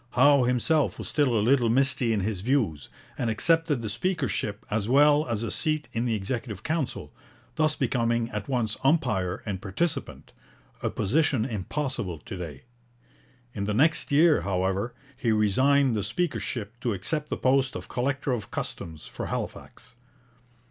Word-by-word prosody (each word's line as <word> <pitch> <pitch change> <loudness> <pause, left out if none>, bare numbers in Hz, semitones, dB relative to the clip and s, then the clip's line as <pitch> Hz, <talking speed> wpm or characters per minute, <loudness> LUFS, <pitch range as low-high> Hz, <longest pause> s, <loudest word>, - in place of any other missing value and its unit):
Howe 140 +1 +5
himself 130 +5 +1
was - - -6
still 135 -6 +2
a 105 - +1
little 125 -2 +4
misty 130 -1 +3
in 105 -3 +1
his 100 -1 -2
views, 110 - 0 0.3
and 120 - 0
accepted 155 +2 +2
the - - -2
speakership 115 - -2
as 105 0 -1
well 145 +2 +5
as 115 -2 -2
a 115 - -3
seat 155 -2 -1
in 115 +1 -1
the 115 -2 +1
Executive 105 0 -4
Council, 155 -4 -3 0.4
thus 155 -1 +1
becoming 120 -3 0
at 105 -2 -4
once 120 -5 0
umpire 105 - +1
and 95 -3 -4
participant, 140 - -3 0.5
a - - 0
position 130 0 +1
impossible 115 - -3
to 75 - -8
day. 80 -7 -7 0.9
In 100 -2 -3
the 105 0 -1
next 155 +6 +2
year, 155 +2 +5
however, 95 +4 -1 0.2
he 120 -2 0
resigned 130 +5 +3
the 105 - 0
speakership 120 - -3
to 120 -3 -1
accept 150 - -2
the - - -2
post 130 0 +2
of - - -6
collector 135 +2 -1
of 120 -4 -3
customs 80 -2 -5
for - - -6
Halifax. - - -6
120 Hz, 155 wpm, -27 LUFS, 105-140 Hz, 0.9 s, Howe